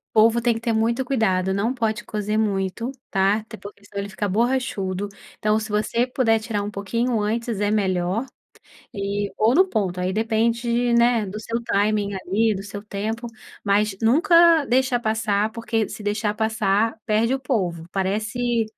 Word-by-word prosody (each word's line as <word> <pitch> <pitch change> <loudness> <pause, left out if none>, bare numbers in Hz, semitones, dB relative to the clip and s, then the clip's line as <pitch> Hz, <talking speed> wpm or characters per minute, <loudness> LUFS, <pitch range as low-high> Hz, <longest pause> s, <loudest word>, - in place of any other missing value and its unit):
Polvo 225 +2 +5
tem 235 0 +2
que 225 - -6
ter 230 -1 0
muito 230 +4 +1
cuidado 190 -7 +1
não 220 +5 0
pode 220 -3 -2
cozer 210 0 -2
muito 205 +2 -1 0.2
tá, 195 +1 +3
até 220 0 -11
porque 205 +1 -12
senão 205 0 -7
ele 200 - -5
fica 200 +1 -3
borrachudo, 205 -4 -1 0.3
então 215 0 +1
se 220 - -5
você 215 +3 0
puder 235 -3 +2
tirar 215 -2 -3
um 205 - -4
pouquinho 230 +4 -1
antes 225 0 -2
é 205 0 +1
melhor, 190 +1 0 0.7
e 200 0 -2
ou 220 +3 +3
no 375 +5 +5
ponto 190 - -1
aí 185 +1 -1
depende, 235 +2 +1
né, 235 -2 +3
do 200 +2 -6
seu 230 +2 -3
timing 205 -2 0
ali 205 +4 +1
do 195 - -5
seu 200 0 -7
tempo, 215 +3 -4 0.4
mas 205 0 +2
nunca 335 - +5
deixa 255 0 +2
passar 220 -2 0
porque 225 -1 -1
se - - -8
deixar 205 0 -1
passar 220 0 +1
perde 225 +4 +2
o - - -1
polvo, 180 -11 -2
parece 220 +5 0
220 Hz, 170 wpm, -23 LUFS, 200-235 Hz, 0.7 s, Polvo